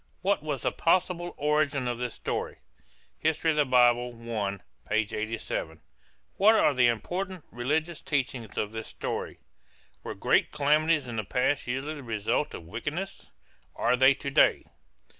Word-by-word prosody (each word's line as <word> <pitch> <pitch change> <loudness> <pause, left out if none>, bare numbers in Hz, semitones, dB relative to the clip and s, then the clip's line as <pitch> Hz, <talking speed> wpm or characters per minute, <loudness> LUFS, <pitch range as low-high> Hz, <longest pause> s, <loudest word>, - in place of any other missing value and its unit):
What 195 -4 +2
was 145 -5 -4
the - - +1
possible 175 0 +1
origin 150 -3 +1
of 120 -1 -2
this 125 -2 -3
story? - - -3 0.6
(Hist. 160 0 0
Bible 150 -6 +3 0.6
I, 100 -2 -1 0.3
87.) 110 -6 -2 0.6
What 215 +3 +6
are 150 - +4
the 125 -2 +4
important 180 - -2
religious 155 +7 -1
teachings 130 -6 -2
of 105 - -1
this 110 0 -6
story? - - -5 0.6
Were - - -6
great - - +2
calamities 150 0 +2
in 120 -2 -5
the 110 - -1
past 125 +7 0
usually 135 +5 -2
the 150 - -8
result 115 +3 -1
of - - -8
wickedness? 150 - -5 0.5
Are - - +2
they 130 +2 +6
to 140 - -5
day? - - +4
140 Hz, 140 wpm, -28 LUFS, 115-155 Hz, 0.6 s, What